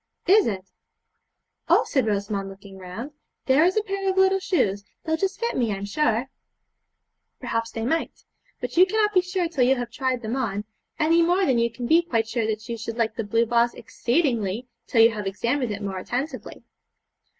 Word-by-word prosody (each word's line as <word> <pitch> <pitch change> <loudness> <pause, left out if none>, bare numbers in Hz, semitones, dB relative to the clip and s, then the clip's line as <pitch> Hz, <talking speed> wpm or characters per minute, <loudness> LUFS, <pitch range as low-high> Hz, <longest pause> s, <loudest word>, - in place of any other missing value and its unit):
'Is, 405 +2 +5
it? 190 -3 -3 1.0
Oh,' - - +5
said 260 -5 0
Rosamond 200 -1 -1
looking 195 0 -12
round 190 +10 -7 0.3
'there 275 +5 +5
is 370 +4 +2
a 430 - +2
pair 395 -1 -2
of 380 - -1
little 380 0 +4
shoes; 205 - 0 0.2
they'll 320 -1 0
just 380 +4 -2
fit 470 0 -1
me, 235 -4 +1
I'm 200 0 -3
sure.' 230 +1 0 1.1
'Perhaps 230 0 -2
they 225 0 -3
might, 325 +6 -2 0.4
but - - -5
you 365 +2 +7
cannot 420 +1 +1
be 365 - +5
sure 360 -1 -1
till 300 -6 0
you 260 +2 +4
have 245 -2 -5
tried 255 -1 -2
them 220 +3 -2
on, 210 -6 -2 0.3
any 330 +2 +3
more 355 +3 +3
than 255 -7 +2
you 235 0 +1
can 240 +1 -6
be 325 +7 +5
quite 230 -10 -1
sure 225 -1 -1
that 220 +1 -3
you 235 -1 -4
should 230 +1 -5
like 225 -2 0
the 225 - -2
blue 225 +3 +1
vase 235 +1 +2
exceedingly 240 - -1 0.2
till 225 -2 +5
you 230 - +6
have 210 -3 -4
examined 235 +5 -1
it 205 0 -5
more 190 -2 -3
attentively.' 255 +10 -5
240 Hz, 195 wpm, -24 LUFS, 220-330 Hz, 1.1 s, you